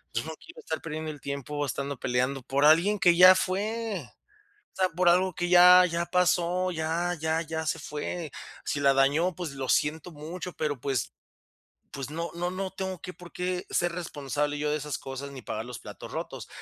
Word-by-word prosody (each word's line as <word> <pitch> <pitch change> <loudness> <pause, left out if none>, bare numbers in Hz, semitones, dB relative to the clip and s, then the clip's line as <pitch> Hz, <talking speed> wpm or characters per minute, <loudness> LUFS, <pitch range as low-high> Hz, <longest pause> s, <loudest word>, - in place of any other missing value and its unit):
yo 115 - 0
no 160 - -5
quiero 330 - -13
estar 160 - -4
perdiendo 155 -1 -4
el 145 - -12
tiempo, 140 +2 -4
estando 140 +1 -3
peleando 130 +2 0
por 140 +3 +1
alguien 170 +7 +5
que 175 -3 +5
ya 185 +2 +9
fue. 200 - -2 0.6
O - - -42
sea, 185 -1 +3
por 175 +1 +3
algo 185 +1 +3
que 175 +1 -2
ya 180 +1 +9
ya 170 0 -1
pasó, 180 0 +2
ya 170 +2 -1
ya 160 +1 0
ya 160 0 -4
se 165 - -1
fue. 150 +1 -5 0.3
Si 145 - -1
la 140 -1 +4
dañó, 145 +6 +2
pues 175 -3 -5
lo 135 -1 -4
siento 160 +4 +1
mucho, 170 +4 -7
pero 150 -4 -2
pues 130 -4 -2 0.8
pues, 140 +1 -6
no 170 +2 -3
no 175 +1 -2
no 190 +1 -3
tengo 190 -2 -5
que 180 - -7
por 180 -1 -14
qué 180 0 -2
ser 175 0 +1
responsable 145 -3 -3
yo 150 0 0
de 150 - +1
esas 150 0 -4
cosas 135 +1 -7
ni 135 - -9
pagar 110 -1 -5
los 125 -1 -7
platos - - -10
rotos. - - -5
160 Hz, 200 wpm, -28 LUFS, 145-180 Hz, 0.8 s, ya